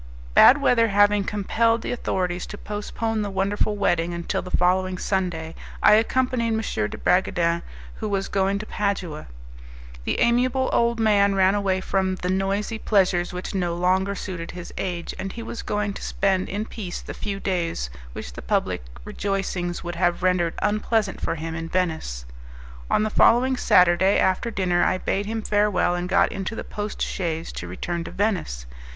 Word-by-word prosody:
Bad 270 - +8
weather 235 -4 +4
having 205 0 +4
compelled 225 +4 +1
the - - -3
authorities 180 -7 -2
to 210 - -8
postpone 215 +2 -3
the 205 - -2
wonderful 200 +2 0
wedding 175 -3 +1
until 170 0 -2
the 180 - -8
following 185 +1 +1
Sunday, 175 -5 -2 0.3
I - - +8
accompanied 240 +2 +2
M. 220 - 0 0.3
de - - -7
Bragadin, 170 -2 +1 0.4
who 215 - -3
was 195 -1 -1
going 195 0 +1
to 210 - -5
Padua. 195 -8 -3 0.8
The - - -1
amiable 250 +2 +2
old 235 0 +2
man 200 -2 +3
ran 190 0 +4
away 195 -2 0
from 190 -1 0
the 180 0 -2
noisy 200 +4 -1
pleasures 185 -5 +2
which 180 +3 -5
no 175 -3 -1
longer 190 +3 +1
suited 180 -3 -6
his 175 -1 -8
age, 175 -3 -3
and 195 0 -4
he 230 - -6
was 230 - -6
going 210 -1 -2
to - - -8
spend 190 -1 0
in 205 +2 -3
peace 195 -6 -6
the - - -8
few 200 -2 -4
days 170 - -2 0.2
which - - -7
the - - -8
public - - 0 0.2
rejoicings 190 -3 -3
would 175 0 -5
have 175 0 +1
rendered 180 -2 +2
unpleasant 210 -1 0
for - - -1
him 165 +1 -5
in 165 0 -5
Venice. 160 - -2 0.6
On - - +3
the 215 - -1
following 255 +5 +4
Saturday, 180 -3 +4
after 190 +5 +1
dinner, 180 -5 +1
I 185 - +2
bade 200 +2 -2
him 225 0 -3
farewell, 205 -4 +2
and 175 +1 -3
got 195 +1 +3
into 195 +3 -4
the - - -5
post 210 0 -4
chaise 165 -3 -3
to 85 - -6
return 170 - -4
to - - -6
Venice. 180 - -1
195 Hz, 175 wpm, -24 LUFS, 175-210 Hz, 0.8 s, Bad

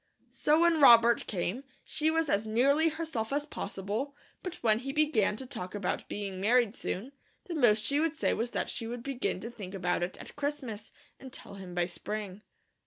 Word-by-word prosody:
So 305 +2 +3
when 340 -2 +4
Robert 235 -3 +7
came, 200 +6 -2 0.2
she 310 0 0
was 325 0 +1
as 215 -4 +1
nearly 280 +8 +3
herself 310 -8 -3
as 290 +1 0
possible, 225 +1 -4 0.3
but 365 - -5
when 220 -1 +4
he 270 +2 -4
began 275 -9 +2
to 265 - -6
talk 185 -6 -6
about 200 -3 -2
being 195 -2 -4
married 235 +1 +3
soon, 230 +9 -4 0.3
the 350 - -5
most 230 -8 +4
she 285 +1 +2
would 325 0 +1
say - - +1
was 235 +2 -1
that - - -2
she 230 - -2
would 235 0 -5
begin 270 -7 -2
to 230 - -6
think 200 -5 -8
about 180 -2 0
it 175 +1 -3
at - - -10
Christmas, 280 -7 -4 0.3
and 265 - -10
tell - - -8
him 190 -3 -9
by 175 -1 +2
spring. 205 +2 -5
235 Hz, 195 wpm, -30 LUFS, 205-290 Hz, 0.3 s, Robert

